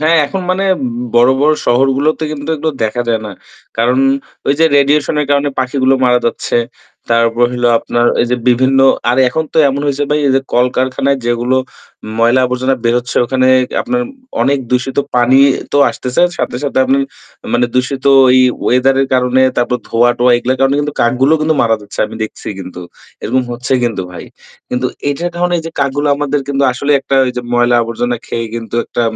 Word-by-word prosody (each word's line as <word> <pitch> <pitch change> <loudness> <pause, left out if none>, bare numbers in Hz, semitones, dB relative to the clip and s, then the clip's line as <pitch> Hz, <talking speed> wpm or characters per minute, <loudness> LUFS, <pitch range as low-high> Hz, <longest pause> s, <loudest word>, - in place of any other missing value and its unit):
হ্যাঁ, 160 +2 +3
এখন 190 +7 -4
মানে 190 +2 0 0.5
বড়-বড় 130 +5 +4
শহরগুলোতে 135 +5 +1
কিন্তু 145 +1 -7
এগুলো 160 +1 -2
দেখা 115 +3 -2
যায় 115 -1 +1
না। - - -7 0.5
কারণ 125 +3 +2 0.5
ওই 140 - +2
যে 165 - +4
রেডিয়েশন 145 +2 +2
এর 150 - -2
কারণে 145 0 +2
পাখিগুলো 130 +1 +1
মারা 125 -1 +3
যাচ্ছে। 115 - -2 0.5
তারপর 115 +1 +2
হইলো 125 -1 0
আপনার 120 0 -1
ওই - - +3
যে 125 - +1
বিভিন্ন, 130 +2 +2 0.3
আর 125 - 0
এখন 160 +5 -2
তো - - 0
এমন 140 +1 -2
হয়েছে 145 0 -1
ভাই 150 0 +1 0.2
যে - - +2
কলকারখানায় 130 +2 0
যেগুলো 120 +2 0 0.6
ময়লা 120 +3 +3
আবর্জনা 130 +1 -1
বেরোচ্ছে 120 +1 -1
ওখানে 130 +1 0 0.4
আপনার 245 0 -1 0.4
অনেক 140 0 +1
দূষিত 125 +1 -1 0.2
পানি 125 +2 +4 0.3
তো 145 - +2
আসতেছে। 125 +6 -2 0.2
সাথে, - - -2
সাথে 140 - -1
আপনি 135 +1 +1 0.6
মানে 120 0 +2
দূষিত 130 +1 -1 0.3
এই 130 - +5 0.2
ওয়েদার 130 +2 +2
এর 135 - -3
কারণে, 125 +1 +2
তারপর 125 +1 0
ধোয়া-টোয়া 120 +1 +2
এগুলোর 125 +2 -2
কারণে 135 +1 +2
কিন্তু 145 0 -4
কাকগুলো 130 +5 +2
কিন্তু 155 +1 +1
মারা 115 -1 +2
যাচ্ছে। 105 0 -13
আমি - - -11
দেখছি 110 - -7
কিন্তু। 90 -1 -8 0.4
এরকম 130 +3 0
হচ্ছে 120 +2 -4
কিন্তু 115 -5 -2
ভাই। 85 - -9 0.4
কিন্তু 125 +1 -1 0.2
এটার 170 +5 -2
কারণে 175 0 0
যে 165 - -5
কাকগুলো 140 +1 0
আমাদের 145 0 -1
কিন্তু 140 0 -1
আসলে 140 +3 -3
একটা 135 - -1
ওই - - -1
যে - - -1
ময়লা 120 0 +3
আবর্জনা 120 +1 -2
খেয়ে 115 0 -3
কিন্তু 115 -1 -6
একটা 120 - -3
130 Hz, 175 wpm, -14 LUFS, 120-140 Hz, 0.6 s, এই